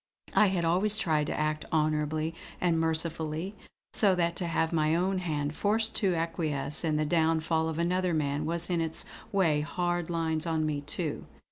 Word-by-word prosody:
I 210 - +5
had 185 -3 0
always 195 +6 +3
tried 155 -7 +1
to - - -2
act 155 0 -1
honourably 155 0 0 0.3
and 170 -2 +2
mercifully, 160 +2 -1 0.4
so 200 -4 +4
that 170 -1 0
to 175 - -2
have 165 0 0
my 155 0 +2
own 185 +2 +1
hand 150 -4 -2
forced 220 +2 +1
to 190 -5 +2
acquiesce 160 -3 -1
in 155 -2 +1
the 155 - +1
downfall 160 0 +1
of 160 - -4
another 180 +1 +1
man 150 0 -1
was 170 +2 -2
in 170 -1 +1
its 160 -1 -2 0.3
way 165 -7 +2
hard 175 +2 -1
lines 165 -1 -1
on 160 -1 0
me 150 -2 -1
too. 150 +2 -4
165 Hz, 175 wpm, -29 LUFS, 155-175 Hz, 0.4 s, I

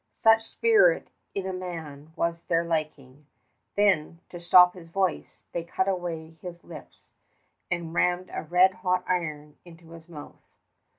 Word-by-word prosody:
Such 225 0 +5
spirit 460 +2 +3 0.3
in 195 -1 -3
a 190 - -3
man 160 -5 -7
was 170 0 -1
to - - -43
their 165 0 +2
liking. 150 -4 -4 0.5
Then, 180 -5 +2
to 175 - -9
stop 180 +1 +6
his 170 -3 -13
voice, 190 0 -2
they 170 - -3
cut 190 +3 -2
away 165 -4 -4
his 175 -1 -9
lips 160 -3 -13 0.6
and 170 -2 -3
rammed 180 +1 0
a - - -3
red 180 +4 +4
hot 185 -1 +1
iron 150 -5 -3
into 165 -1 -16
his 165 0 -13
mouth. 150 -4 -11
170 Hz, 155 wpm, -26 LUFS, 160-185 Hz, 0.6 s, stop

